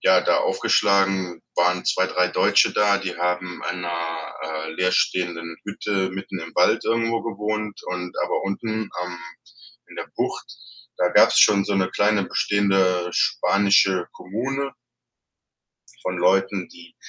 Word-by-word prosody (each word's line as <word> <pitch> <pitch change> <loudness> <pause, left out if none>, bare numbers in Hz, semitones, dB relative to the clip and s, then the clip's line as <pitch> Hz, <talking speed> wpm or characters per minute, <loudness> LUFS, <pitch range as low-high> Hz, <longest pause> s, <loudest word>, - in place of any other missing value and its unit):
ja, - - +5
da - - +2
aufgeschlagen, 95 -3 +1
waren 90 +1 +2
2, 95 - +1
3 90 -1 +1
Deutsche - - +3
da, 100 -1 +3
die 95 -3 -5
haben 90 0 -2
in 90 - -6
'ner, 85 -2 -4
äh, 80 0 -5
leerstehenden 85 -2 0
Hütte 100 -2 -2
mitten 95 0 -6
im 80 0 -9
Wald 90 +5 +3
irgendwo 115 0 0
gewohnt 105 -1 -4
und 90 0 -5
aber - - -1
unten, 100 +3 -4 0.3
ähm, 90 -1 -6 0.7
in - - -14
der - - -6
Bucht, - - -3 0.5
da 90 - +2
gab's - - +5
schon 100 -2 +5
so 100 - -1
'ne 95 -1 +1
kleine 105 0 +2
bestehende 95 -4 +1
spanische 100 -2 +2
Kommune 135 +8 -4 1.3
von 90 0 -3
Leuten, 95 +1 +1
die 85 0 -16
95 Hz, 135 wpm, -23 LUFS, 90-100 Hz, 1.3 s, ja